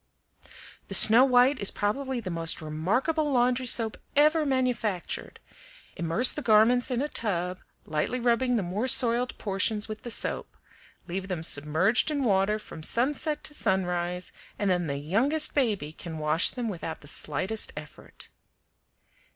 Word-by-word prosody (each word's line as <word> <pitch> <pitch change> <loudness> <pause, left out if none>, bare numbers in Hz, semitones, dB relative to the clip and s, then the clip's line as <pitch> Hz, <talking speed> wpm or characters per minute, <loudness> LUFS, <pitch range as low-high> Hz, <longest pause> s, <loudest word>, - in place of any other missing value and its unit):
"The - - -2
Snow 230 +4 +8
White 255 +1 +3
is 200 - +4
probably 260 +5 -3
the 190 -6 -6
most 165 -1 -2
remarkable 235 - -1
laundry 250 0 +1
soap 225 -2 0 0.2
ever 305 +2 +3
manufactured. 250 -8 -2 0.6
Immerse 170 +9 +3
the 300 - -6
garments 235 +2 +3
in 250 +1 -1
a - - -2
tub, 180 -8 -3 0.3
lightly 155 +11 -2
rubbing 245 +1 +1
the 215 - 0
more 195 +8 -3
soiled 245 -1 +5
portions 210 +1 -2
with 215 0 -8
the 240 - -8
soap; - - -1 0.5
leave 190 +2 -5
them 180 -4 -4
submerged 160 - +2
in 290 -2 -2
water 205 -1 +1
from 210 -6 -11
sunset 290 - 0
to - - -6
sunrise, 180 -5 -2 0.3
and 200 -2 0
then 175 -2 -1
the 140 -1 -3
youngest 245 - 0
baby 210 - -1
can 165 -1 -9
wash 155 +2 +1
them 245 -2 -4
without 165 -5 -6
the 145 - -14
slightest 185 +10 -1
effort." 150 0 -12
215 Hz, 150 wpm, -26 LUFS, 175-250 Hz, 0.6 s, Snow